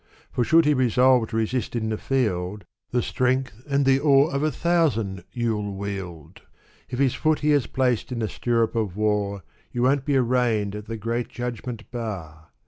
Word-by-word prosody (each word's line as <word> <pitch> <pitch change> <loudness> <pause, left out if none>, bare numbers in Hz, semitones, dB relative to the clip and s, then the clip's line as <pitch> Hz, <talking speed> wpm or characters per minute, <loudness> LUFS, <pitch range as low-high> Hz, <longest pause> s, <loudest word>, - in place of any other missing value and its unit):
For 125 - +1
should 165 +6 +5
he 150 - +4
resolve 125 -2 +3
to - - -5
resist 115 +3 -1
in 110 -2 -1
the 110 - -1
field, 105 -7 -1 0.3
The 125 -1 0
strength 130 -2 -1
and 140 0 +2
the 135 0 +4
awe 140 0 +5
of 140 0 -1
a 155 0 +1
thousand 135 - 0
you'll 110 -4 -2
wield. 95 -5 -6 0.5
If 125 - -4
his 135 -2 +2
foot 155 -1 +1
he 150 0 +2
has 145 -4 +2
placed 130 -2 0
in 125 - -3
the 110 -2 -1
stirrup 115 +1 0
of 105 -5 -1
war, 105 -2 0 0.3
You 120 - -1
won't 135 +1 +2
be 140 -2 +2
arraigned 120 -5 +1
at 105 +1 -7
the 115 - -4
Great 115 +3 -2
Judgment 120 -2 -6
Bar. 90 -10 -6
120 Hz, 185 wpm, -24 LUFS, 105-130 Hz, 0.5 s, should